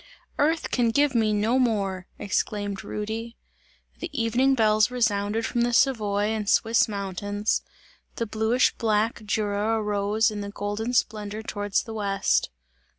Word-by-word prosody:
"Earth 315 +3 +1
can 240 -2 +2
give 285 +4 +2
me 220 -3 +2
no 215 +5 +2
more!" 195 -6 0
exclaimed 205 0 -2
Rudy. 220 +2 -5 0.6
The 340 - -5
evening 245 +4 +2
bells 215 -2 +3
resounded 225 -2 0
from 240 - -1
the 240 0 +1
Savoy 210 -5 +2
and 215 -2 -2
Swiss 225 +1 +3
mountains; 205 0 -2 0.5
the 230 - -2
bluish 220 +3 +2
black 220 0 +1
Jura 210 +1 0
arose 210 +1 +1
in 210 - -5 0.2
golden 205 +4 -3
splendour 215 -2 -1
towards 205 -2 -1
the 225 - -8
west. 200 - 0
215 Hz, 135 wpm, -25 LUFS, 205-230 Hz, 0.6 s, bells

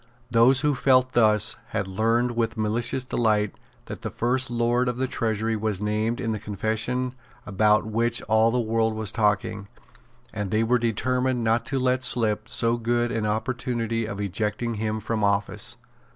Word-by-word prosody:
Those 125 +3 +5
who 150 -1 +2
felt 130 -1 +3
thus 110 -4 +3
had 100 -3 -3
learned 115 +5 +1
with 115 -1 -1
malicious 115 +4 -1
delight 110 -4 0 0.3
that - - -8
the - - -4
First 130 +2 0
Lord 120 +1 +1
of 125 - -3
the 130 - 0
Treasury 110 -3 -1
was 105 -3 -2
named 110 +3 -1
in 115 -3 -2
the 110 - -3
confession 110 +5 -2 0.3
about 105 +2 +2
which 115 +2 0
all 110 +1 +3
the 125 +2 0
world 115 -1 0
was 110 -2 -2
talking; 105 -1 0 0.7
and 105 -3 -3
they 110 +3 +1
were 120 +2 +2
determined 125 +2 0
not 115 +1 +1
to 135 - -2
let 130 0 +1
slip 110 -3 +2
so 115 0 +1
good 120 +1 0
an 110 -2 -1
opportunity 115 0 -2
of 100 -2 -6
ejecting 105 +4 -2
him 110 0 -2
from 110 0 -2
office. 100 +3 -1
115 Hz, 165 wpm, -25 LUFS, 105-120 Hz, 0.7 s, Those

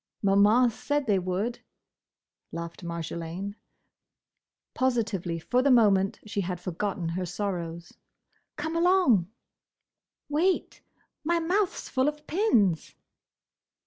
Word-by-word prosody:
"Maman 205 +5 +5
said 275 +5 -1
they 205 -4 +2
would!" 190 +7 -2 0.9
laughed 170 +1 -7
Marjolaine. 170 +3 -5 1.2
Positively, 220 -9 0
for 245 +10 +1
the 280 - +3
moment 200 -6 +4
she 205 -1 -2
had 180 -1 -3
forgotten 180 0 -3
her 180 +2 -2
sorrows. 170 -3 -4 0.6
"Come 315 +2 -4
along!" 335 - +4 1.0
"Wait! 335 +6 0 0.4
My 340 +2 +2
mouth 365 +4 +1
's - - -7
full 260 +1 +1
of 300 0 -3
pins!" 230 - +1
205 Hz, 105 wpm, -27 LUFS, 180-285 Hz, 1.2 s, Maman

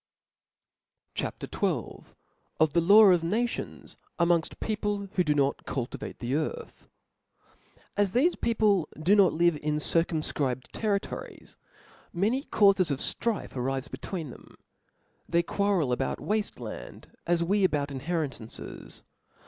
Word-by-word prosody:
CHAP. - - -4
XIL - - -2 0.5
Of 155 -2 +3
the 170 - +4
Laijp 200 +3 +7
of 170 -2 +1
Nations 230 +8 -3 0.2
among 170 -1 +4
Jl - - -11
People 205 -2 -2
who 180 - +2
d$ 150 -3 +1
not 140 -1 +1
cultivate 125 -3 -4
the 120 +2 -3
Earth. 460 - -4 1.1
AS 205 -1 +2
thefe 300 +9 +2
people 210 -6 +2
do 180 +7 +4
not 195 -3 +5
live 170 -1 +3
in 150 0 -1
circumfcribed 150 -5 0
territories, 205 -2 -3 0.6
many 220 +10 0
caufes 195 -4 +4
of 140 - 0
ftrife 225 - 0
arife 135 +2 -3
between 165 -8 -5
them; - - -15 0.7
they 170 0 +3
quarrel 195 -7 +1
about 125 - -1
wafte 210 0 -2
land, - - -9
as 170 0 +2
we 200 +4 +1
about 145 -5 +1
inheritances. 140 -5 -5
170 Hz, 125 wpm, -28 LUFS, 150-205 Hz, 1.1 s, Laijp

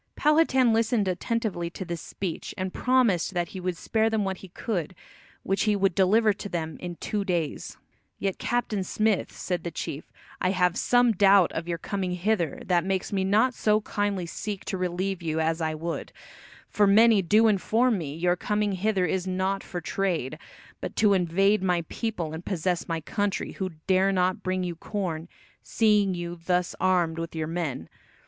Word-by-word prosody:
Powhatan 290 -6 +4
listened 225 -2 +2
attentively 190 -2 -2
to 185 +2 -7
this 170 -1 -5
speech, 185 -5 -5
and 185 0 -3
promised 235 -8 +2
that 175 -1 0
he 190 - -7
would 180 -1 -3
spare 220 +4 +1
them 220 -2 0
what 190 -1 -2
he 190 - -11
could, 185 -2 -4 0.5
which 195 +3 0
he 210 -1 +3
would 195 -2 +2
deliver 210 +4 +4
to 205 +1 -7
them 160 -3 -3
in 175 -1 -6
two 205 +4 -2
days. 175 -6 -2 0.4
"Yet, 195 -2 -2
Captain 225 -5 -1
Smith," 215 +1 0
said 180 -1 -3
the 170 - -3
chief, 150 -2 -6 0.3
"I 185 - +2
have 180 -2 +2
some 245 -1 +3
doubt 195 -3 +5
of 165 +1 -4
your 170 -1 -2
coming 185 +2 -3
hither 180 -3 -1
that 175 -2 +2
makes 190 +1 -2
me 190 -1 +1
not 215 +7 +3
so 215 -2 +2
kindly 205 -3 -2
seek 200 +3 -5
to - - -3
relieve 185 +1 -2
you 160 -1 -1
as 160 +1 0
I 155 -1 -1
would, 165 +2 -4 0.6
for 205 -1 +2
many 220 +1 +6
do 215 +5 +4
inform 220 +2 +2
me 145 -3 -5
your 175 +2 +1
coming 210 +2 -1
hither 190 0 +1
is 185 +2 -1
not 190 +1 -1
for 175 - -6
trade, 175 -11 -2 0.4
but - - -6
to 210 -2 +4
invade 195 +3 +2
my 180 -3 +1
people 190 -9 -3
and 160 +2 -6
possess 180 -2 -1
my 165 -1 -2
country, 205 +4 -2
who 190 -1 -3 0.2
dare 190 +1 +3
not 185 -1 +1
bring 185 0 -1
you 175 -1 -3
corn, 170 -3 -4 0.3
seeing 210 -4 +2
you 175 0 -5
thus 180 0 0
armed 175 -3 +2
with 165 0 -5
your 160 -1 -1
men. 160 - -3
185 Hz, 180 wpm, -26 LUFS, 175-210 Hz, 0.6 s, many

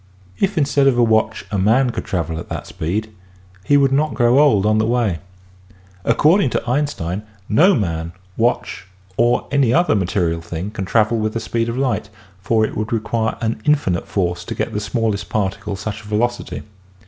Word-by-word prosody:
If 195 -1 0
instead 140 -2 +3
of 130 -3 +3
a 120 - +4
watch 110 -1 +1
a 100 - 0
man 120 +6 +3
could - - -5
travel 80 -3 -2
at - - -9
that - - -5
speed 105 +7 -3 0.5
he 145 +9 +4
would 135 -1 +3
not 150 +3 +1
grow 120 +2 +4
old 130 -10 +4
on 110 0 +3
the 110 - +2
way. 115 -8 0 0.8
According 150 - +3
to 120 - -3
Einstein 120 - -1 0.3
no 175 - +5
man, 85 -5 -2 0.2
watch 100 -4 -1 0.3
or 120 +3 +2
any 140 -4 +3
other 175 +7 +3
material 90 -4 0
thing 85 +4 -5
can 100 -3 -4
travel 110 +3 +2
with 110 0 -1
the - - 0
speed 115 +1 -2
of 115 - -3
light, 130 -6 -1 0.3
for 110 +2 +2
it - - -6
would 110 +1 -3
require 115 0 -1
an 110 -1 -2
infinite 140 - +1
force 90 -3 -1
to - - -5
give 115 - -3
the 105 - -1
smallest 110 -1 -2
particle 100 0 -2
such 100 +2 -5
a - - -13
velocity. 120 +3 -2
110 Hz, 185 wpm, -19 LUFS, 100-125 Hz, 0.8 s, no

